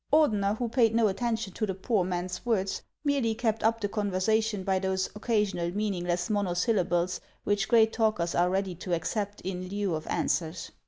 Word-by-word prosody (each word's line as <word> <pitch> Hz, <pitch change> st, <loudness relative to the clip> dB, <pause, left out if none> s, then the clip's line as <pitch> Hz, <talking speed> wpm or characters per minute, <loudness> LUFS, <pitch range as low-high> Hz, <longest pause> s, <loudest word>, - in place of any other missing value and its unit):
Ordener, 215 Hz, -9 st, +3 dB
who 240 Hz, -, -1 dB
paid 230 Hz, -1 st, +3 dB
no 230 Hz, -2 st, +4 dB
attention 225 Hz, -1 st, -2 dB
to 215 Hz, -, -2 dB
the 190 Hz, -, -2 dB
poor 195 Hz, +1 st, +1 dB
man's 180 Hz, 0 st, -3 dB
words, 200 Hz, -5 st, 0 dB, 0.2 s
merely 275 Hz, -6 st, +1 dB
kept 225 Hz, -1 st, 0 dB
up 225 Hz, +1 st, +2 dB
the 205 Hz, -, -1 dB
conversation 210 Hz, +1 st, 0 dB
by 190 Hz, 0 st, +1 dB
those 190 Hz, 0 st, 0 dB
occasional 210 Hz, -6 st, 0 dB
mean 210 Hz, -1 st, 0 dB
ingless 175 Hz, -1 st, -1 dB
monosyllables 180 Hz, -2 st, +1 dB, 0.2 s
which 205 Hz, -1 st, +1 dB
great 225 Hz, -1 st, +5 dB
talkers 215 Hz, -7 st, +1 dB
are 175 Hz, +1 st, +3 dB
ready 190 Hz, 0 st, -1 dB
to 175 Hz, +1 st, -2 dB
accept 205 Hz, +5 st, -3 dB
in 185 Hz, 0 st, -4 dB
lieu 200 Hz, -2 st, -1 dB
of 155 Hz, 0 st, -4 dB
answers. 165 Hz, 0 st, -1 dB
200 Hz, 175 wpm, -28 LUFS, 180-220 Hz, 0.2 s, great